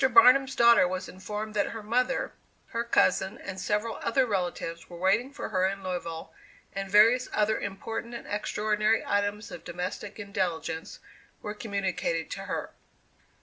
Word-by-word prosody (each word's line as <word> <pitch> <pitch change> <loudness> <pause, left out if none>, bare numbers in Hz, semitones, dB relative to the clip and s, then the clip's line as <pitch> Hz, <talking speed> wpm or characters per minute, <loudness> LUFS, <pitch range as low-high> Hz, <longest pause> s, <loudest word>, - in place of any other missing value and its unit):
Barnum's 270 -5 +7
daughter 235 -5 +7
was 185 +1 -3
informed 210 +3 -5
that 205 -1 +1
her 225 -2 -6
mother, 250 +5 0 0.4
her 230 -1 -1
cousin, 215 -4 +2
and 190 0 -7
several 210 +2 -1
other 255 +3 +2
relatives 175 -5 -3
were 175 - -9
waiting 195 +9 +2
for 285 - -5
her 185 -3 +2
in 195 0 -4
Louisville, 165 -3 -4 0.4
and 195 0 -4
various 225 +5 +6
other 215 +1 +2
important 225 +4 -5
and 235 - -7
extraordinary 210 +1 +1
items 205 +1 -1
of - - -8
domestic 180 +3 -5
intelligence 185 -6 -3 0.4
were 210 - -3
communicated 195 -6 -2
to - - -5
her. - - -3
205 Hz, 150 wpm, -28 LUFS, 185-225 Hz, 0.4 s, Barnum's